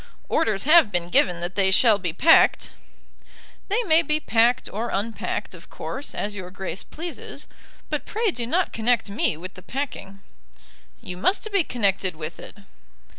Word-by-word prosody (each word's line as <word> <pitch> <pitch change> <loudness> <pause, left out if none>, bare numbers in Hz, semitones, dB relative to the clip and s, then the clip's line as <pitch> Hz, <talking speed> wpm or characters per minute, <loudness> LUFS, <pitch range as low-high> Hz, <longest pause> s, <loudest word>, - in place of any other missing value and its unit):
"Orders 215 -11 +1
have 310 -6 +6
been 175 -2 -1
given 175 -1 +3
that 175 +2 -3
they 195 -1 +3
shall 210 +2 +5
be 180 -3 -2
packed." 320 - +4 1.0
"They 430 +5 +1
may 330 -5 +4
be 305 -2 0
packed 240 -2 +2
or 225 +4 -4
unpacked, 215 +3 -3
of - - -13
course, 275 +2 -6
as 205 0 -3
your 185 -2 -7
Grace 190 +1 -6
pleases, 335 +2 -7 0.4
but - - -4
pray 440 -1 0
do 240 -7 -4
not 355 +8 0
connect 225 -2 +1
me 200 -6 0
with 185 +3 -8
the 185 - -12
packing." 245 -6 -5 0.8
"You 180 - -7
must 380 - 0
be 395 -3 +3
connected 195 - 0
with 155 +1 -7
it." - - -11
220 Hz, 165 wpm, -24 LUFS, 190-305 Hz, 1.0 s, have